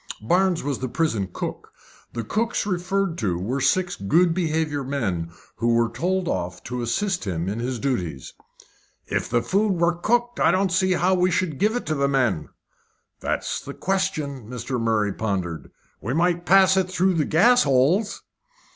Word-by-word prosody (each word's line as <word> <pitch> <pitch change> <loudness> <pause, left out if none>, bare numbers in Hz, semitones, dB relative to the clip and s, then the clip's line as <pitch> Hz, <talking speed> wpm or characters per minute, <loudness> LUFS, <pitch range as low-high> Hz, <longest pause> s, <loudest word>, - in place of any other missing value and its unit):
Barnes 180 - +1
was 140 -2 -2
the 130 - -3
prison 115 - -1
cook. - - -6 0.4
The 115 - -3
cooks 225 - -1
referred 190 -1 -1
to 95 -6 0
were 120 +10 -2
six 180 +3 +1
good 165 - +2
behaviour 160 -4 -1
men 105 -12 -2 0.3
who 115 0 +2
were 115 0 +2
told 180 +8 -1
off 90 - -3
to 125 +1 -4
assist 180 - -1
him 85 -3 -2
in 105 +4 -3
his 125 +1 -2
duties. 90 - -3 0.7
"If - - -2
the 120 0 +1
food 200 +1 +1
were 170 -1 +2
cooked, 240 +7 0
I - - +4
don't 190 0 +2
see 185 0 +2
how 180 +2 +2
we 180 0 +3
should 170 -5 -1
give 215 +3 +2
it 245 - -3
to 155 - -1
the 140 -2 +1
men." 120 - 0 0.7
"That's - - -2
the - - -8
question." 145 - -2
Mr. 125 0 -4
Murray 110 -3 +1
pondered. 95 -7 -3 0.3
"We 120 +6 -2
might 175 +1 +1
pass 190 0 +6
it 185 -1 +1
through 185 +1 +2
the 160 -4 +1
gas 240 +10 +5
holes." 145 - +2
155 Hz, 175 wpm, -23 LUFS, 115-185 Hz, 0.7 s, pass